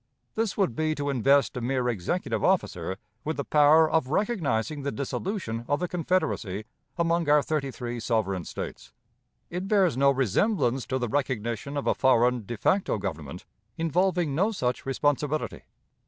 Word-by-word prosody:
This 225 -2 -1
would 190 - +1
be 155 +2 0
to 145 -1 -2
invest 135 +3 +3
a 125 - -3
mere 125 +1 0
executive 120 - -1
officer 95 - 0 0.3
with 155 +1 -3
the 140 - -1
power 150 +2 +5
of 160 -4 +1
recognizing 155 - 0
the 140 +1 -2
dissolution 140 - -3
of 145 - +1
the 180 - -1
confederacy 160 - -1 0.3
among 170 -2 +1
our 150 -1 +5
thirty 150 -3 -1
three 120 -2 -5
sovereign 110 -5 -1
States. - - -7 0.6
It 180 +3 -3
bears 195 - +3
no 140 +2 +4
resemblance 135 - +1
to 130 - -1
the 120 -2 -1
recognition 125 +1 -2
of 140 - -2
a - - +3
foreign 125 -3 +2
de 120 - -4
facto 190 - +1
government 80 -5 -6 0.3
involving 175 -1 +1
no 195 +10 +2
such 125 - -2
responsibility. 145 +2 -1
140 Hz, 155 wpm, -27 LUFS, 120-165 Hz, 0.6 s, power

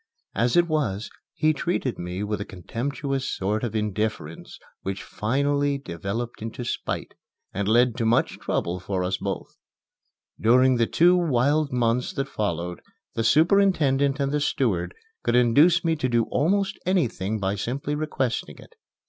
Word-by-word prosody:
As 120 - +1
it 175 0 +5
was, 120 - -1 0.2
he 155 0 +3
treated 150 -5 -2
me 90 +3 -4
with 105 0 -2
a - - -1
contemptuous 135 - -4
sort 105 +4 -1
of 115 -2 -3
indifference 105 -6 -3 0.2
which 95 0 -4
finally 140 +5 0
developed 110 - -5
into 115 +2 -5
spite, - - -3 0.4
and 100 +1 -2
led 120 +2 +4
to 115 - 0
much 115 - +1
trouble 90 +2 -2
for 95 0 -2
us 95 +1 -1
both. - - -5 0.8
During 125 +3 +4
the 115 -1 +2
two 175 +2 +4
wild 150 -2 +2
months 125 0 0
that 135 0 -2
followed, 90 -7 -3 0.3
the 115 - -1
superintendent 150 - +3
and 140 0 0
the 150 0 0
steward 145 - 0 0.3
could 120 - +1
induce 145 +9 +5
me 165 -1 +2
to 130 -3 -1
do 120 -1 +3
almost 190 +8 +1
anything 115 - 0
by 95 0 0
simply 130 +8 -3
requesting 150 -5 -2
it. - - -15
125 Hz, 150 wpm, -25 LUFS, 105-145 Hz, 0.8 s, it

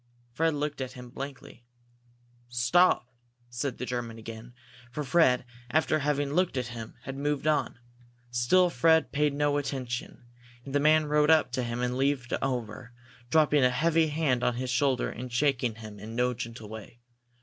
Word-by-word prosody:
Fred 160 +4 +1
looked 145 -1 -3
at 130 - -4
him 125 -1 -11
blankly. 135 -2 -8 0.8
"Stop!" 120 +2 +3 0.4
said 125 +1 -3
the 125 - -4
German 120 -2 -4
again, 115 +2 -10 0.4
for 150 +5 -3
Fred, 125 -4 +3 0.2
after 155 +3 +2
having 145 -1 0
looked 180 -4 +1
at 125 -1 -2
him, 115 -2 -8
had 135 - -6
moved 145 +1 -2
on. 155 -4 +1 0.5
Still 170 +10 +3
Fred 160 +5 +3
paid 150 0 +2
no 145 0 +1
attention, 135 - -4 0.4
and 135 - -7
the 145 - +3
man 155 +1 +4
rode 150 0 +2
up 155 -5 +4
to 130 - -1
him 120 0 -3
and 125 0 -1
leaned 135 -1 +1 0.2
over, 120 -1 -3 0.4
dropping 150 0 +4
a 125 - +5
heavy 160 +5 +2
hand 145 -5 0
on 125 - +1
his 125 +1 -3
shoulder 130 0 +1
and 125 +1 -7
shaking 125 -3 +1
him 110 -2 -10
in 110 +3 -8
no 125 +1 +1
gentle 115 -2 -7
way. 110 +2 -10
130 Hz, 170 wpm, -28 LUFS, 120-150 Hz, 0.8 s, a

